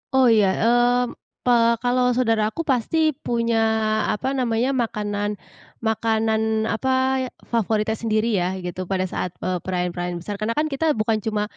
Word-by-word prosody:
Oh 255 Hz, -3 st, +5 dB
ya, 210 Hz, -3 st, +4 dB, 0.2 s
mmm, 245 Hz, +1 st, +2 dB, 0.2 s
pe 245 Hz, -, +2 dB, 0.3 s
kalau 250 Hz, 0 st, +2 dB
saudara 225 Hz, -4 st, +2 dB
aku 330 Hz, +10 st, -4 dB
pasti 310 Hz, +4 st, +1 dB
punya 235 Hz, -1 st, +1 dB, 0.5 s
apa 255 Hz, +5 st, -1 dB
namanya, 250 Hz, -1 st, 0 dB
makanan 210 Hz, -4 st, -2 dB, 0.5 s
makanan 220 Hz, 0 st, +1 dB
apa, 225 Hz, +4 st, -1 dB, 0.6 s
favoritnya 220 Hz, -1 st, +1 dB
sendiri 220 Hz, 0 st, 0 dB
ya, 180 Hz, +1 st, -1 dB
gitu 180 Hz, 0 st, -5 dB
pada 190 Hz, -1 st, 0 dB
saat, 180 Hz, -1 st, -4 dB
eee, 185 Hz, -1 st, -1 dB
perayaan-perayaan 180 Hz, 0 st, -3 dB
besar 205 Hz, +1 st, -5 dB
karena 225 Hz, +2 st, -1 dB
kan 305 Hz, 0 st, 0 dB
kita 305 Hz, +1 st, +1 dB
bukan 215 Hz, 0 st, 0 dB
cuma 210 Hz, 0 st, -1 dB
225 Hz, 145 wpm, -22 LUFS, 210-245 Hz, 0.6 s, Oh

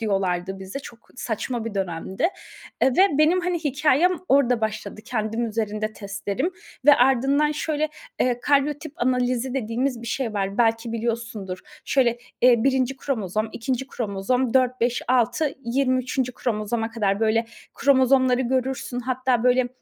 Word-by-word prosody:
diyorlardı 195 Hz, -3 st, -1 dB
bize. 190 Hz, +8 st, -6 dB
Çok 235 Hz, -4 st, -13 dB
saçma 230 Hz, 0 st, -3 dB
bir 225 Hz, -3 st, -5 dB
dönemdi, 190 Hz, -, -1 dB, 0.5 s
eee, 265 Hz, -, +5 dB
ve 370 Hz, -7 st, +4 dB
benim, 335 Hz, +4 st, +4 dB
hani, 355 Hz, -1 st, -1 dB
hikâyem 295 Hz, +4 st, +3 dB, 0.2 s
orada 250 Hz, -4 st, +3 dB
başladı. 215 Hz, -1 st, -3 dB
Kendim 225 Hz, 0 st, -2 dB
üzerinde 215 Hz, -1 st, -2 dB
testlerim 200 Hz, -, -3 dB, 0.4 s
ve 290 Hz, -, +9 dB
ardından 270 Hz, +4 st, +3 dB
şöyle, 310 Hz, 0 st, -1 dB, 0.3 s
eee, 245 Hz, -1 st, +1 dB
karyotip 290 Hz, +2 st, +1 dB
analizi 250 Hz, +1 st, 0 dB
dediğimiz 240 Hz, +1 st, -1 dB
bir -, -, -8 dB
şey 230 Hz, -3 st, -2 dB
var, 195 Hz, +2 st, -2 dB
belki 230 Hz, 0 st, +2 dB
biliyorsundur. 225 Hz, -5 st, -3 dB, 0.3 s
Şöyle, 240 Hz, -3 st, +2 dB, 0.2 s
eee, 240 Hz, -2 st, +5 dB
1. 265 Hz, -1 st, +1 dB
kromozom, 215 Hz, -5 st, -2 dB
2. 260 Hz, +2 st, -2 dB
kromozom, 235 Hz, +3 st, -1 dB
4-5-6, 250 Hz, +2 st, +1 dB
23. 255 Hz, 0 st, 0 dB
kromozoma 225 Hz, 0 st, -2 dB
kadar, 205 Hz, -3 st, 0 dB
böyle, 225 Hz, +1 st, +2 dB, 0.3 s
kromozomları 260 Hz, -2 st, +4 dB
görürsün. 255 Hz, 0 st, -1 dB
Hatta, 255 Hz, -2 st, +1 dB
böyle, 250 Hz, 0 st, +3 dB
245 Hz, 130 wpm, -24 LUFS, 220-265 Hz, 0.5 s, ve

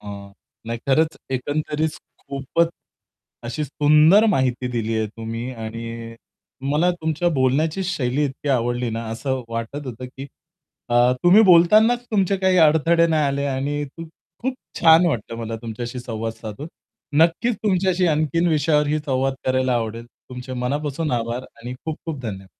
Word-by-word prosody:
अ, -, -, -15 dB, 0.6 s
नाही 115 Hz, 0 st, -3 dB
खरंच 155 Hz, +4 st, +2 dB, 0.2 s
एकंदरीत 150 Hz, +4 st, -1 dB, 0.3 s
खूपच 140 Hz, +5 st, -1 dB, 0.8 s
अशी 125 Hz, +6 st, -3 dB
सुंदर 150 Hz, -, +5 dB
माहिती 130 Hz, -4 st, 0 dB
दिली 115 Hz, -1 st, -1 dB
आहे 110 Hz, -, 0 dB
तुम्ही 115 Hz, +3 st, -6 dB
आणि 115 Hz, 0 st, -7 dB, 0.6 s
मला 160 Hz, +5 st, +3 dB
तुमच्या 160 Hz, +2 st, 0 dB
बोलण्याची 150 Hz, +7 st, +1 dB
शैली 145 Hz, -5 st, 0 dB
इतकी 140 Hz, +1 st, -4 dB
आवडली 120 Hz, -2 st, 0 dB
ना, 115 Hz, +1 st, -4 dB
असं 130 Hz, +3 st, -3 dB
वाटत 115 Hz, +5 st, -5 dB
होतं, 125 Hz, 0 st, -7 dB
की 135 Hz, +2 st, -9 dB, 0.6 s
अ, 120 Hz, +1 st, +4 dB
तुम्ही 185 Hz, +5 st, +7 dB
बोलतानाच 215 Hz, +6 st, +5 dB
तुमचे 195 Hz, -2 st, +2 dB
काही 190 Hz, -1 st, +2 dB
अडथळे 165 Hz, +1 st, +4 dB
नाही 160 Hz, -2 st, +1 dB
आले 140 Hz, 0 st, -1 dB
आणि 140 Hz, +2 st, -2 dB
खूप 165 Hz, -1 st, -8 dB, 0.3 s
खूप 260 Hz, +1 st, -1 dB, 0.3 s
छान 165 Hz, +1 st, +7 dB
वाटलं 115 Hz, -7 st, -2 dB
मला 115 Hz, -1 st, -4 dB
तुमच्याशी 120 Hz, +2 st, -5 dB
संवाद 115 Hz, -2 st, -4 dB
साधून. 115 Hz, +4 st, -8 dB, 0.6 s
नक्कीच 175 Hz, +9 st, +2 dB
तुमच्याशी 185 Hz, -3 st, +2 dB
आणखीन 155 Hz, +2 st, +1 dB
विषयावरही 150 Hz, -1 st, +2 dB
संवाद 135 Hz, -2 st, -1 dB
करायला 130 Hz, -1 st, +1 dB
आवडेल. 115 Hz, 0 st, -3 dB, 0.2 s
तुमचे 125 Hz, +1 st, -8 dB
मनापासून 145 Hz, +5 st, -2 dB
आभार 120 Hz, +1 st, -2 dB, 0.2 s
आणि 120 Hz, +2 st, -6 dB
खूप 160 Hz, -1 st, -3 dB
खूप 155 Hz, -4 st, -4 dB
धन्य 95 Hz, -4 st, -6 dB
140 Hz, 145 wpm, -22 LUFS, 120-160 Hz, 0.8 s, तुम्ही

